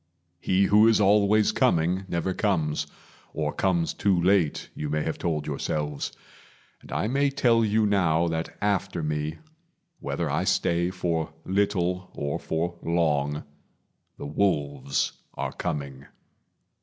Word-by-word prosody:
He 95 +2 +2
who 105 +3 +6
is 115 -1 +4
always 105 +1 +4
coming 90 +4 +1
never 85 +1 -1
comes, 80 -8 0 0.5
Or 75 -1 -1
comes 85 -4 +1
too 95 -3 +2
late, 90 -3 +2
you 75 - -4
may 75 0 0
have 80 - -3
told 75 -4 -1
yourselves; 75 0 -3 0.7
And - - -14
I - - -1
may 140 +4 +2
tell 120 -5 +3
you 110 0 +2
now 85 -5 +2
that 80 0 -4
after 100 -5 0
me, 75 +1 -2 0.6
Whether - - -2
I - - 0
stay 85 +1 +1
for 85 -3 -2
little 90 -2 0
or 70 0 -2
for 85 +2 -3
long, 75 -4 0 0.7
The - - -7
wolves 70 -5 0 0.2
are - - -3
coming. 70 -5 -4
85 Hz, 130 wpm, -26 LUFS, 75-100 Hz, 0.7 s, who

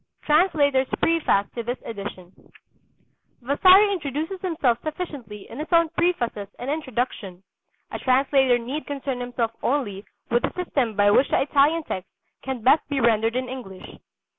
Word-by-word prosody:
TRANSLATOR'S 295 -5 +3
PREFACE 325 -12 +2
TO 235 - -4
THIS 240 +2 -4
EDITION 200 -4 -7 1.1
Vasari 370 - +5
introduces 320 +2 -4
himself 310 -10 0
sufficiently 285 - -6
in 235 - -10
his 305 - -4
own 335 -1 +4
prefaces 275 - -1
and 260 +3 -4
introduction; 245 - -4 0.5
a - - -5
translator 265 -1 +3
need 255 +6 -5
concern 275 -3 -4
himself 245 -2 -2
only 225 -8 -1 0.3
with 240 +1 +3
the 270 - -2
system 275 - -1
by 205 0 +4
which 265 - +4
the - - +2
Italian 295 +4 +2
text 185 -9 -6 0.3
can 260 -4 -5
best 265 +6 +5
be 285 -2 -1
rendered 225 -1 +2
in 255 0 -1
English. 240 -8 -9
265 Hz, 145 wpm, -24 LUFS, 230-305 Hz, 1.1 s, Vasari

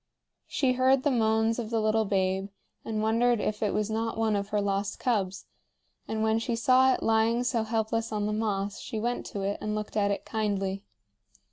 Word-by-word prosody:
She 260 -2 +1
heard 260 +1 +3
the 290 - +2
moans 225 -1 +2
of 225 -2 -4
the 225 -1 0
little 215 0 +2
babe, 190 0 0 0.3
and 215 -1 -2
wondered 230 +2 +2
if 210 0 -2
it 210 -2 +1
was 215 0 -1
not 225 +1 -2
one 220 -1 +1
of 200 0 -2
her 210 - 0
lost 200 0 -1
cubs; 195 -6 -1 0.6
and 220 0 -2
when 220 0 +2
she 230 +1 -2
saw 255 +3 +4
it - - -6
lying 225 +2 +2
so 245 -2 0
helpless 225 +1 -1
on 210 -1 -1
the 210 - -1
moss 205 -2 -2
she 220 - -5
went 240 +2 -2
to 200 - -5
it 200 +1 -2
and 210 0 -2
looked 210 0 -5
at 205 -1 +2
it 200 - -2
kindly. 200 -3 -2
220 Hz, 205 wpm, -28 LUFS, 205-230 Hz, 0.6 s, saw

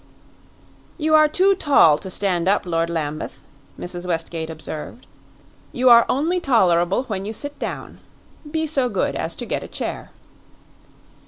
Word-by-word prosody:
"You 310 -1 0
are 310 0 +7
too 375 +6 +3
tall 275 - +4
to 190 - -7
stand 185 -2 -1
up, 200 0 +2
Lord 165 -1 -1
Lambeth," 155 -2 -4 0.4
Mrs. 175 0 -6
Westgate 165 -1 -3
observed. 160 +8 -8 0.7
"You 250 0 +3
are 235 0 +7
only 325 +7 +1
tolerable 190 - +2
when 205 -7 -4
you 215 +2 -5
sit 285 +5 -5
down. - - -6 0.5
Be 320 +1 -1
so 275 -5 +1
good - - -1
as - - -3
to - - -6
get - - -3
a - - -8
chair." - - -5
205 Hz, 150 wpm, -21 LUFS, -, 0.7 s, are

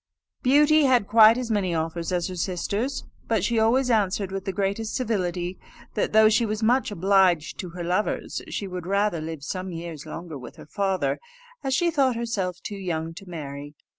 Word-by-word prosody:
Beauty 295 +3 +5
had 250 -6 +3
quite 220 +1 +7
as 250 -2 -3
many 190 -5 0
offers 165 +2 -2
as 175 -1 0
her 185 - -6
sisters, 200 +9 -2 0.2
but 225 -5 +1
she 230 +2 +1
always 250 +3 +3
answered, 200 -3 +1
with 195 0 -4
the 195 - -1
greatest 200 +3 -2
civility, 185 -6 -2 0.3
that 210 - 0
though 220 0 +7
she 220 +2 +3
was 215 0 -2
much 245 +4 +3
obliged 190 -4 +2
to 180 - -5
her 175 +1 -6
lovers, 180 +5 -1
she 205 - -3
would 180 -2 -6
rather 200 -3 +1
live 160 -2 -6
some 185 +5 -4
years 165 -2 -7
longer 165 -2 -7
with 125 - -10
her - - -12
father, 195 +2 -1 0.4
as 265 -1 +1
she 345 +4 +2
thought 270 -5 +2
herself 200 -7 -2
too 205 - -5
young 165 -4 -3
to 195 +2 -11
marry. 145 -3 -7
195 Hz, 190 wpm, -25 LUFS, 175-225 Hz, 0.4 s, quite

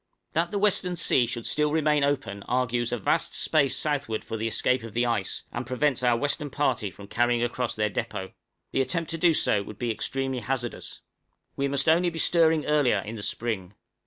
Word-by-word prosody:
That 170 +2 +1
the 205 - -2
western 195 -3 +2
sea 130 -7 +3
should 120 -1 -4
still 150 0 +2
remain 150 -2 +2
open 130 -8 -1
argues 120 -1 0
a 120 - 0
vast 100 - 0
space 145 -4 +2
southward 145 -7 -2
for - - -5
the 110 +1 -2
escape 125 +3 +1
of 115 -2 -9
the 120 +1 +2
ice, 115 -5 -1
and 120 - -3
prevents 130 +1 0
our 120 -2 +3
western 145 +3 -1
party 130 -7 0
from 100 +2 -12
carrying 120 +2 +1
across 120 0 -2
their 105 0 +1
depôt: 95 -1 -4 0.4
the 135 - +1
attempt 160 +5 -2
to 165 - -3
do 170 -2 +4
so 105 - +3
would 105 +1 -9
be 120 -2 -1
extremely 135 +4 -2
hazardous. 120 +1 -4 0.5
We 140 - 0
must 140 +1 -1
only 170 +2 +4
be 165 - -8
stirring 160 -1 +3
earlier 145 -7 +3
in 110 +4 -7
the 105 - -7
spring. 100 -4 -3
130 Hz, 200 wpm, -26 LUFS, 115-150 Hz, 0.5 s, do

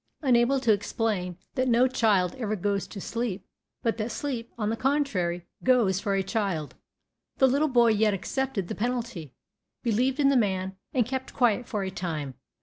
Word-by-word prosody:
Unable 255 0 +4
to 230 -4 +4
explain 200 -3 -2 0.2
that 255 0 0
no 245 +1 +5
child 210 -8 +2
ever 215 -3 -1
goes 200 0 -1
to 200 - -8
sleep, 210 -3 -3 0.4
but 230 -1 0
that 220 +1 -2
sleep, 240 -3 -4
on 215 -1 -1
the - - 0
contrary, 210 - 0 0.2
"goes" 235 -8 +3
for 200 -1 -1
a 195 - +1
child, 190 -7 -2 0.6
the 265 - +5
little 280 +4 +2
boy 240 -4 +4
yet 215 -1 +3
accepted 210 +1 -2
the - - -4
penalty, 230 - -3 0.5
believed 250 +4 +1
in 275 -1 +5
the 275 - +3
man, 190 -5 0 0.2
and 250 -5 +2
kept 260 +2 -5
quiet 245 -1 +2
for 210 -3 -2
a 190 - -3
time. 155 -7 -4
225 Hz, 175 wpm, -27 LUFS, 190-250 Hz, 0.6 s, no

